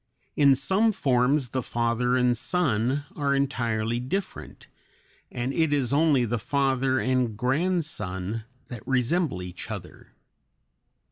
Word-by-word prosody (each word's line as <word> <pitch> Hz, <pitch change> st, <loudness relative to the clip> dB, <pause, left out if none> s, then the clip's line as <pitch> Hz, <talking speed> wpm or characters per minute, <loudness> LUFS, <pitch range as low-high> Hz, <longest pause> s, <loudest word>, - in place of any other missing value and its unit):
In 140 Hz, -2 st, +5 dB
some 210 Hz, -, +2 dB
forms 135 Hz, -, +1 dB
the 130 Hz, +2 st, -2 dB
father 120 Hz, +1 st, 0 dB
and 125 Hz, -1 st, +3 dB
son 135 Hz, -, 0 dB
are 140 Hz, -2 st, +1 dB
entirely 120 Hz, -4 st, -1 dB
different, 180 Hz, +10 st, -5 dB, 0.7 s
and 125 Hz, +2 st, -3 dB
it 160 Hz, -1 st, +1 dB
is 140 Hz, -3 st, +1 dB
only 145 Hz, -4 st, +3 dB
the 120 Hz, +1 st, -2 dB
father 135 Hz, +1 st, +1 dB
and 125 Hz, -4 st, 0 dB
grandson 125 Hz, -, -1 dB, 0.2 s
that 120 Hz, -4 st, -7 dB
resemble 130 Hz, -, 0 dB
each 90 Hz, 0 st, -8 dB
other. -, -, -9 dB
130 Hz, 120 wpm, -26 LUFS, 120-145 Hz, 0.7 s, In